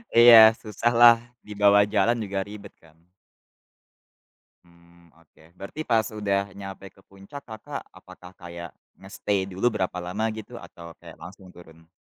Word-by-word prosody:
Iya 115 -2 +8
susah 110 +1 -3
lah 120 0 +7 0.3
dibawa 105 -1 +3
jalan 105 +3 0
juga 100 -1 -4
ribet 100 -1 -11
kan. 80 -1 -23 1.7
Mmm, 85 -1 -24
oke 80 0 -25
berarti 100 - -9
pas 115 -3 +1
udah 100 -2 -2
nyampe 95 0 -10
ke 95 - -25
puncak 100 +9 -13
Kakak 110 -2 -9
apakah 90 0 -15
kayak 85 -1 -10 0.3
nge-stay 95 0 -3
dulu 95 +5 -1
berapa 95 -5 -4
lama 90 +5 -4
gitu 110 -1 -10
atau 85 -1 -13
kayak - - -15
langsung 95 +1 -13
turun? 80 -1 -18
100 Hz, 140 wpm, -24 LUFS, 90-110 Hz, 1.7 s, Iya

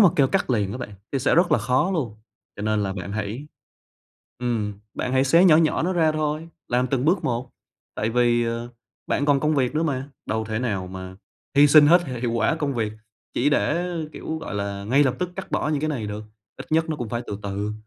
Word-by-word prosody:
mà 200 - +8
kêu 140 - +5
cắt - - 0
liền 105 -5 +1
á 125 - -5
bạn 120 - -6 0.2
thì 135 - +1
sẽ 130 - +2
rất 175 -1 +4
là - - +5
khó 130 +9 +1
luôn, 140 - -2 0.4
cho 105 - -6
nên 110 -1 +1
là 95 -1 -1
bạn 95 0 -6
hãy, 110 +7 -4 0.9
ừm, 115 -4 -1 0.2
bạn 125 - -2
hãy 130 +1 +3
xé 165 +7 +5
nhỏ 165 -5 +7
nhỏ 160 0 +2
nó 180 +3 0
ra 160 -3 +3
thôi, 155 +1 -2 0.2
làm 125 +1 +2
từng 130 0 -1
bước 175 +4 +2
một, 125 +1 -2 0.4
tại 110 +1 -1
vì, 120 0 +3
ờ, 115 +1 -3 0.4
bạn 145 - 0
còn 140 -2 +4
công 155 +1 +2
việc 135 0 +1
nữa 155 - +1
mà, 140 -4 -2 0.2
đâu 110 0 -1
thể 110 0 -3
nào 100 -7 -2
mà 95 0 -8 0.4
hy 145 +1 +8
sinh 145 0 +8
hết 175 +3 +6
h - - -5
hiệu 120 -1 -1
quả 115 +6 +2
công 145 -4 -2
việc 110 -3 -1 0.4
chỉ 140 +4 +2
để, 165 +4 +1 0.3
kiểu, 160 - -5
gọi 160 - -6
là, 100 -1 -3
ngay 130 +7 +4
lập 130 - +1
tức 180 -1 -2
cắt - - -6
bỏ - - 0
những 150 -2 0
cái 155 - -1
này 125 -8 -2
được, 105 +1 -5 0.3
ít - - -9
nhất 160 +1 +2
nó 155 - -1
cũng 120 -5 -4
phải 120 +2 -3
từ 100 - -5
từ. 100 +1 -3
125 Hz, 240 wpm, -24 LUFS, 110-155 Hz, 0.9 s, mà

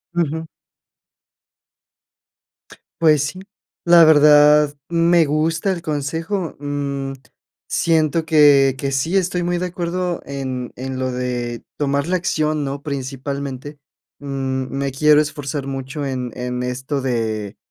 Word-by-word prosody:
Ujú. 160 -1 -1 2.5
Pues 155 -3 +4
sí, 145 +6 -5 0.4
la 170 -1 +7
verdad 150 -1 +6
me 170 0 +3
gusta 155 +5 0
el 180 -2 -3
consejo, 160 +4 -3
mm, 140 -1 -3 0.5
siento 160 -1 +1
que, 145 -4 +5
que 140 0 -3
sí 160 +8 0
estoy 180 -1 0
muy 175 0 -1
de 180 - -2
acuerdo 180 0 -3
en 130 -3 -5
en 130 +1 -5
lo 130 0 -1
de 125 -1 -3
tomar 140 -1 0
la 185 +1 +1
acción, 155 -3 -1
¿no?, 140 0 -5
principalmente, 140 0 -5 0.4
mm, 135 -2 -3
me 140 0 -2
quiero 150 +2 +4
esforzar 145 -2 -3
mucho 135 +2 -5
en 130 -2 -3
en 125 0 -3
esto 130 +3 -3
de, 110 -5 -2
145 Hz, 120 wpm, -20 LUFS, 135-160 Hz, 2.5 s, la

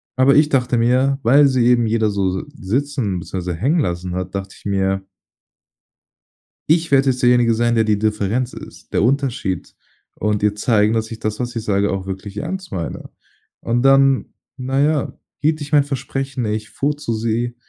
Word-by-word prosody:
aber 130 +2 +4
ich 150 +1 +5
dachte 125 -4 +1
mir, 130 +4 +2
weil 140 +5 +6
sie 130 -3 +2
eben 120 -2 +3
jeder 110 -1 +1
so 100 -2 0
so 95 - -3
sitzen, 125 -4 -2
beziehungsweise 90 -1 -5
hängen 145 - +1
lassen 90 -6 -2
hat, 95 0 -4
dachte 95 0 -5
ich - - -20
mir 95 -1 0 1.7
ich 165 -1 +2
werde 135 -1 +4
jetzt 125 0 -1
derjenige 120 -2 +4
sein, 120 +1 +1
der 110 -1 +3
die 105 -1 +1
Differenz 110 +4 -1
ist, - - -12
der - - +2
Unterschied 130 -6 -1 0.4
und 105 0 -1
ihr 105 -1 +3
zeigen, 105 -1 +2
dass 110 0 -1
ich 115 - -7
das, 110 +1 -3
was 120 0 -4
ich 115 - -3
sage, 100 -1 +1
auch 95 -1 -3
wirklich 95 +1 -7
ernst 185 - -5
meine. 85 -4 -5 0.5
Und 120 +1 0
dann, 135 0 +3 0.2
na 130 +1 -2
ja, 150 0 0 0.2
hielt 155 +2 0
ich 145 - -7
mein 145 -2 +5
Versprechen, 135 -2 -4
ich 105 0 -3
fuhr 145 +2 -1
zu 130 -5 -4
sie, 115 +2 -2
120 Hz, 185 wpm, -19 LUFS, 105-135 Hz, 1.7 s, weil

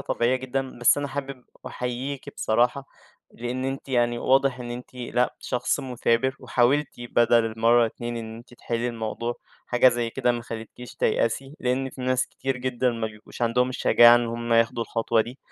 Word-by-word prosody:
طبيعية 120 +2 +1
جدًا، 130 0 -4
بس 120 +4 +4
أنا 145 - -3
حابب 135 -2 -6 0.2
أحييكِ 125 +3 -4
بصراحة، 125 +5 +1 0.4
لإن 125 +2 -4
أنتِ 135 +1 -4
يعني 120 -2 +1
واضح 135 0 +2
إن 120 0 -6
أنتِ 125 +1 -8
لأ 125 0 -1
شخص 125 - -1
مثابر، 125 0 0
وحاولتِ 130 +3 +2
بدَل 120 -1 +3
المرّة 115 +1 +3
اتنين 120 +1 -5
إن 110 -1 -6
أنتِ 120 +1 -14
تِحلّي 120 0 -2
الموضوع، 115 +1 -3 0.3
حاجة 125 +1 +5
زَي 120 -1 -1
كده 125 -1 +1
ما 120 -1 -4
خلّتكيش 115 +2 -9
تيأسي، 135 +6 0
لإن 130 +2 -1
في 130 - -11
ناس 130 0 +1
كتير 135 -1 -4
جدًا 125 0 0
ما 115 -2 -3
بيبقوش 105 +2 -10
عندهم 125 +2 +2
الشجاعة 120 -2 +6
إن 120 0 0
هُم 120 0 -3
ياخدوا 115 0 +3
الخطوة 115 0 0
دي. 120 +4 -5
120 Hz, 170 wpm, -25 LUFS, 115-130 Hz, 0.4 s, الشجاعة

